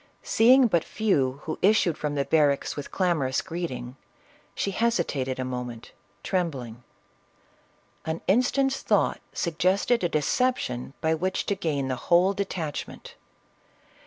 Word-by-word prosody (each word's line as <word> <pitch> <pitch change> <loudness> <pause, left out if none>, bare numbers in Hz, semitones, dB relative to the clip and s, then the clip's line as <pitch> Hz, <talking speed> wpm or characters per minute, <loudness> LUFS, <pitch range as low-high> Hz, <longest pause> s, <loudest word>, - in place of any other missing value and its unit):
Seeing 255 +3 +5
but 175 -8 +2
few 145 -11 0
who 160 - -5
issued 190 -5 +3
from 150 -1 -3
the 140 -1 0
barracks 145 -3 +2
with 145 - -6
clamorous 160 -8 0
greeting, 130 -7 -5 0.6
she 200 - -1
hesitated 170 - 0
a 130 - -3
moment, 125 -2 -6 0.3
trembling; 135 - -3 1.2
an 160 +1 -3
instant's 265 +6 +2
thought - - +1
suggested 185 +7 +1
a 175 - +2
deception 150 - -1
by 160 0 +2
which 185 +4 -1
to 200 - 0
gain 150 -8 -2
the 130 -1 -2
whole 180 +3 +5
de 200 0 -1
tachment. 160 -6 -6
165 Hz, 130 wpm, -26 LUFS, 135-195 Hz, 1.2 s, Seeing